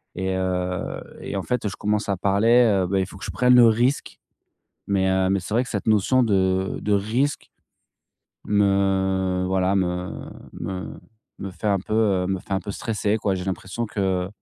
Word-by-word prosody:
et 95 0 -2
heu, 90 -1 -2 0.2
et - - -5
en 95 - -1
fait, 125 -2 -2
je 95 - -5
commence 105 0 -1
à 95 - 0
parler 100 0 +3
bah, 95 +1 0
il 95 - -1
faut 100 - -12
que - - -8
je - - -4
prenne 125 0 +4
le 120 -1 +8
risque 120 +5 0 0.7
mais 95 -1 +1
heu, 95 0 +2
mais 100 0 +2
c'est 100 +4 -6
vrai 120 - +3
que 125 - -10
cette 100 - -3
notion 110 +4 +3
de 95 -3 +1
de 105 - 0
risque 115 +8 -1 0.9
me 95 -2 +1
voilà, 95 +1 +1
me 90 -1 -1 0.4
me 90 +1 -6 0.4
me 95 - -5
fait 105 +5 -3
un 100 -1 +2
peu 105 +3 -4
heu, 100 -5 +2
me 95 -1 -2
fait 100 - -9
un - - +1
peu 100 +2 -6
stresser, 105 -1 -1
quoi. 100 -2 0
J'ai 90 - -5
l'impression 95 +5 -4
que 95 -3 -1
95 Hz, 190 wpm, -23 LUFS, 95-105 Hz, 0.9 s, le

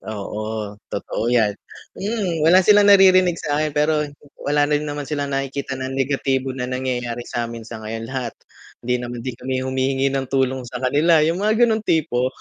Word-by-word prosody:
Oo. 105 0 -5 0.2
Totoo 100 - -3
'yan. 110 -4 +3 0.5
Mm, 195 -6 -2
wala 180 +2 +7
silang 205 -1 +6
naririnig 185 -3 +6
sa'kin, 150 +1 -1
pero 150 +1 +2 0.4
wala 145 0 +2
na 150 - -2
rin 150 - -5
naman 145 0 -4
silang 145 -1 -3
nakikita 135 0 -3
na 130 0 -4
negatibo 135 0 0
na 125 - -3
nangyayari 125 -2 -3
sa'min 115 -1 -4
sa 115 -1 -7
ngayon. 115 +1 -5
Lahat 130 -3 -4 0.5
hindi 125 +1 0
naman 120 -1 -6
din 125 -1 -5
kami 130 0 -2
humihingi 130 +1 0
ng 135 -1 -2
tulong 130 -1 0
sa 125 +1 -6
kanila, 155 +5 +4
'yung 165 +4 +1
mga 220 +4 +3
gano'ng 220 -1 0
tipo. 130 -6 +1
135 Hz, 175 wpm, -21 LUFS, 125-155 Hz, 0.5 s, wala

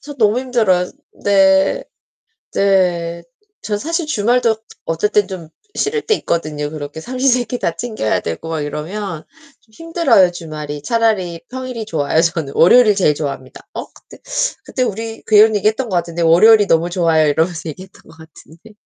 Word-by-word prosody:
저 290 0 -9
너무 220 0 +2
힘들어요. 215 -9 +1 0.3
네. 195 -1 +3 0.7
네. 175 -4 +1 0.4
저 210 -1 -2
사실 330 +6 -2
주말도 235 -2 +1 0.3
어쩔 165 +6 0
땐 205 -2 +2
좀 175 -4 -8 0.3
싫을 435 +1 -1
때 435 - +1
있거든요. 150 - -3
그렇게 150 +1 -7
삼시세끼 250 0 0
다 165 - -1
챙겨야 215 - -2
되고 85 - -5
막 160 -2 -2
이러면 165 +4 -5 0.4
좀 220 - -31
힘들어요, 295 - +2
주말이. 150 -4 -7
차라리 205 -6 0
평일이 255 -3 -5
좋아요. 160 -3 0
저는 165 -5 -2
월요일을 210 +4 +6
제일 165 -6 +3
좋아합니다. 135 -3 -6
어? - - -4
그때 - - -17 0.5
그때 255 - -4
우리 225 0 -4
그런 215 0 +5
얘기 205 +1 +1
했던 225 +2 -1
것 185 - -2
같은데 170 0 -2
"월요일이 205 +6 +6
너무 165 +2 +2
좋아요." 165 -3 +2
이러면서 160 +2 0
얘기했던 185 +4 -11
것 165 0 -18
같은데. 160 +5 -16
190 Hz, 355 characters per minute, -17 LUFS, 165-225 Hz, 0.7 s, 월요일을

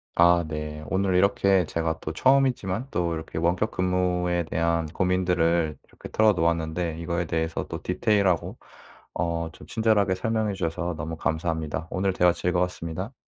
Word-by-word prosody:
아 85 0 +5
네. 75 0 -5
오늘 95 0 +1
이렇게 95 -1 +3
제가 80 0 -2
또 80 - -4
처음이지만 130 0 +2
또 85 -1 0
이렇게 80 0 -7
원격 90 +6 +1
근무에 90 -1 0
대한 85 +1 0
고민들을 85 -2 +1
이렇게 - - -12
털어 110 -1 +4
놓았는데 85 -1 -1
이거에 85 +1 -2
대해서 80 -1 -2
또 - - -5
디테일하고 95 -1 +1 0.6
어 85 0 -1
좀 - - -14
친절하게 110 -4 +2
설명해 110 +1 -1
주셔서 85 -1 -2
너무 80 +2 -4
감사합니다. 80 -1 -2
오늘 95 +1 0
대화 90 -1 +4
즐거웠습니다. 90 - -2
90 Hz, 360 characters per minute, -25 LUFS, 80-95 Hz, 0.6 s, 아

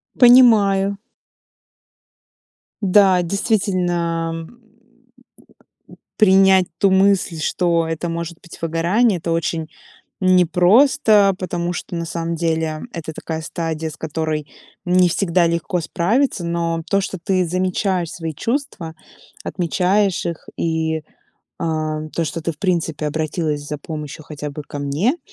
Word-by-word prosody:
Понимаю. 210 -6 +5 1.8
Да, 190 -2 +4
действительно, 175 -4 0 0.2
м, 240 0 -21 1.6
принять 190 -3 +5
ту 195 - +3
мысль, 190 -3 +2
что 170 0 +1
это 165 +1 -3
может 170 0 -5
быть 175 - -13
выгорание, 175 +6 +1
это 165 +1 -4
очень 165 -1 -2 0.5
непросто, 195 - +4
потому 175 -1 -3
что, 175 - -6
на 170 0 -3
самом 165 +1 -3
деле- 160 -1 -1
это 160 -2 -6
такая 160 +1 -5
стадия, 160 -1 -4
с 155 - -11
которой 155 -1 -3 0.4
не 180 0 +4
всегда 175 -2 +2
легко 170 +1 -1
справиться. 190 - 0
Но 170 -1 -1
то, 200 - +3
что 190 - -4
ты 185 -2 +1
замечаешь 185 0 -1
свои 165 -2 -5
чувства, 230 - -3 0.5
отмечаешь 185 +2 0
их, 170 -2 -6
и, 160 -1 -1 0.6
а, 155 -1 -2
то, 170 - +1
что 165 - -4
ты, 165 0 -2
в - - -23
принципе, 165 -5 -1
обратилась 155 -1 -2
за 150 - -4
помощью 150 0 -7
хотя 150 -1 -6
бы 145 +1 -7
ко 145 - -7
мне, 160 - 0
170 Hz, 125 wpm, -20 LUFS, 160-190 Hz, 1.8 s, Понимаю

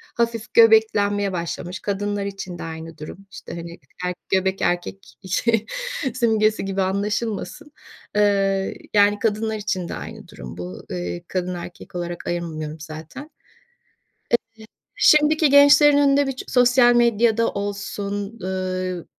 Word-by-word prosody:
Hafif 230 -1 -2
göbeklenmeye 205 -3 +4
başlamış. 175 +1 -4
Kadınlar 205 0 -2
için 195 -3 -6
de - - -5
aynı 160 0 -8
durum. 155 +4 -8
İşte, - - -9
hani, 170 0 -7 0.3
er 180 - -1 0.2
göbek 190 0 +1
erkek 175 +2 -2
şey 225 +3 +1 0.5
simgesi 220 -3 +2
gibi 195 0 -1
anlaşılmasın, 210 +9 -3 0.4
eee, 195 -2 +1 0.2
yani, 205 0 +4
kadınlar 220 0 0
için 200 -4 -3
de - - -4
aynı - - -9
durum 65 +5 -10
bu. 90 +1 -7
Eee, 90 -1 -4
kadın, 180 -1 -3
erkek 175 +1 -10
olarak 175 0 -5
ayırmıyorum 160 -3 -4
zaten. 160 - -9
Eee, 305 - -17 1.7
şimdiki 305 0 +5
gençlerin 285 +1 +7
önünde 280 -1 +4
bir - - 0
çı 260 - -8
sosyal 245 -1 +5
medyada 230 -1 +3
olsun, 200 +1 -4
ııı, 185 -2 -3
200 Hz, 130 wpm, -22 LUFS, 180-230 Hz, 1.7 s, gençlerin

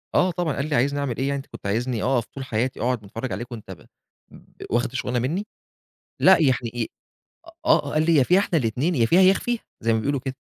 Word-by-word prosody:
آه 180 0 +4
طبعًا، 170 -4 -1
قال 140 - -2
لي: - - 0
"عايزني 140 +4 +1
أعمل 135 -5 -2
إيه 135 - -1
يعني؟ 140 0 0
أنت 135 - -7
كنت - - -8
عايزني 115 +2 -1
أقف 125 -3 +1
طول 135 -1 -8
حياتي 120 +3 -2
أقعد 125 0 0
باتفرّج 115 +5 -6
عليك 120 +1 -5
وأنت 110 -3 -8
ب - - -12 0.5
ب - - -14
واخد 120 +1 0
الشغلانة 125 -1 -2
مني؟" 170 - -2 0.7
لأ 190 0 +7
يعني 130 -4 +4 0.2
إ 115 -2 -1 0.8
آه، - - +3
قال 155 +1 +1
لي 165 - +4
يا 135 - +6
فيها 180 +8 +4
إحنا 180 -4 +1
الاتنين، 130 +8 0
يا 115 -4 +3
فيها 175 +9 +4
يا 190 +1 +7
أخفيها 240 +4 -2 0.2
زي 115 +1 +1
ما 110 - +2
بيقولوا 140 +3 -1
كده. 130 - -3
130 Hz, 235 wpm, -23 LUFS, 120-155 Hz, 0.8 s, لأ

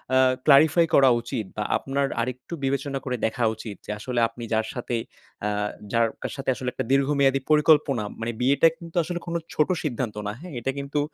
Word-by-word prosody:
আ - - +6 0.3
clarify 155 +3 +6
করা 135 -1 +7
উচিত. 120 -2 -4
বা 105 - 0
আপনার 140 +1 -1
আরেকটু 125 +6 -5
বিবেচনা 140 0 -1
করে 125 -2 -1
দেখা 120 +2 -1
উচিত 110 -1 -7
যে - - -5
আসলে 125 +2 -2
আপনি 115 +1 -10
যার 110 0 +1
সাথে 125 -1 -3 0.5
আ - - +1 0.4
যার 115 -1 +3
কা - - -2
সাথে 135 0 -3
আসলে 125 0 -3
একটা - - -3
দীর্ঘমেয়াদী 135 0 +3
পরিকল্পনা 150 -5 +4 0.2
মানে 115 +1 -2
বিয়েটা 140 +5 +5
কিন্তু 170 -1 -12
আসলে 175 +2 -4
কোন 170 - -3 0.2
ছোট 150 - +2
সিদ্ধান্ত 125 -7 -2
না, - - -1
হ্যাঁ? 180 -2 -9
এটা 135 +3 -1
কিন্তু, 140 +1 -2
135 Hz, 190 wpm, -25 LUFS, 120-145 Hz, 0.5 s, করা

